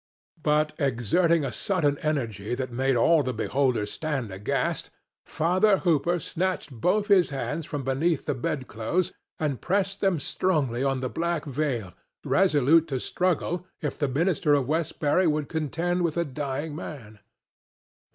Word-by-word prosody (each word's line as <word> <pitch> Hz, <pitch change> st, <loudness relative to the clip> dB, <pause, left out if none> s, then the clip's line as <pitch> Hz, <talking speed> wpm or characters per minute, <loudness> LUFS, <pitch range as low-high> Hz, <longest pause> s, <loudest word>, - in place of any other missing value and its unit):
But, 150 Hz, 0 st, +2 dB
exerting 145 Hz, -, +2 dB
a 130 Hz, -, -2 dB
sudden 145 Hz, -, 0 dB
energy 120 Hz, -8 st, -2 dB
that 130 Hz, 0 st, -4 dB
made 130 Hz, +2 st, +1 dB
all 160 Hz, +7 st, +4 dB
the 130 Hz, -2 st, -3 dB
beholders 125 Hz, -7 st, 0 dB
stand 135 Hz, -9 st, -3 dB
aghast, 95 Hz, +2 st, -2 dB, 0.4 s
Father 185 Hz, +5 st, +3 dB
Hooper 170 Hz, +1 st, +2 dB
snatched 180 Hz, +1 st, -2 dB
both 180 Hz, -, +1 dB
his 195 Hz, -4 st, +4 dB
hands 150 Hz, +3 st, -3 dB
from 145 Hz, -2 st, -4 dB
beneath 140 Hz, +4 st, 0 dB
the -, -, 0 dB
bedclothes 135 Hz, -, -2 dB, 0.2 s
and 145 Hz, -5 st, -2 dB
pressed 195 Hz, +1 st, 0 dB
them 190 Hz, -5 st, +2 dB
strongly 140 Hz, -6 st, 0 dB
on 135 Hz, -1 st, 0 dB
the 130 Hz, -, -2 dB
black 170 Hz, 0 st, -2 dB
veil, 130 Hz, -9 st, -2 dB, 0.3 s
resolute 165 Hz, -3 st, +4 dB
to 135 Hz, -4 st, -2 dB
struggle 180 Hz, +2 st, -1 dB
if 150 Hz, -4 st, -3 dB
the 145 Hz, -, 0 dB
minister 150 Hz, +2 st, +2 dB
of 140 Hz, -3 st, +1 dB
Westbury 160 Hz, +2 st, +1 dB
would 150 Hz, -2 st, 0 dB
contend 165 Hz, +3 st, -1 dB
with 170 Hz, -2 st, 0 dB
a 170 Hz, -, +1 dB
dying 145 Hz, +2 st, -4 dB
man. 115 Hz, -10 st, -8 dB
150 Hz, 145 wpm, -26 LUFS, 130-170 Hz, 0.4 s, all